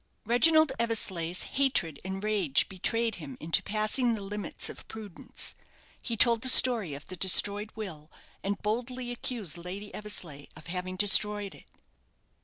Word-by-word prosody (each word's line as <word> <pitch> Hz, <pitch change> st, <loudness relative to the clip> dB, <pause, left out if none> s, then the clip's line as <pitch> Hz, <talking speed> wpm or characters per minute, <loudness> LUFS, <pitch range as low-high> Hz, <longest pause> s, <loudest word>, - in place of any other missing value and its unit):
Reginald 315 Hz, +6 st, +3 dB
Eversleigh's 190 Hz, -7 st, -1 dB
hatred 220 Hz, -, 0 dB
and 190 Hz, +1 st, -6 dB
rage 200 Hz, -10 st, +1 dB
betrayed 225 Hz, +4 st, -1 dB
him 145 Hz, -6 st, -10 dB
into 160 Hz, +1 st, +1 dB
passing 220 Hz, +3 st, +1 dB
the 210 Hz, -, -8 dB
limits 205 Hz, +1 st, -5 dB
of -, -, -11 dB
prudence. 210 Hz, -5 st, -6 dB, 0.5 s
He 230 Hz, -3 st, -4 dB
told 235 Hz, 0 st, +6 dB
the 260 Hz, -, +3 dB
story 230 Hz, -, +6 dB
of 145 Hz, -, -12 dB
the 185 Hz, -, -9 dB
destroyed 205 Hz, +3 st, +3 dB
will, 165 Hz, -8 st, -9 dB, 0.3 s
and 200 Hz, +1 st, -3 dB
boldly 245 Hz, +3 st, -4 dB
accused 230 Hz, -, -6 dB
Lady 195 Hz, +4 st, -9 dB
Eversleigh 170 Hz, -9 st, -4 dB
of 155 Hz, +1 st, -14 dB
having 185 Hz, +1 st, -6 dB
destroyed 205 Hz, +1 st, +2 dB
it. -, -, -18 dB
205 Hz, 145 wpm, -27 LUFS, 180-230 Hz, 0.5 s, told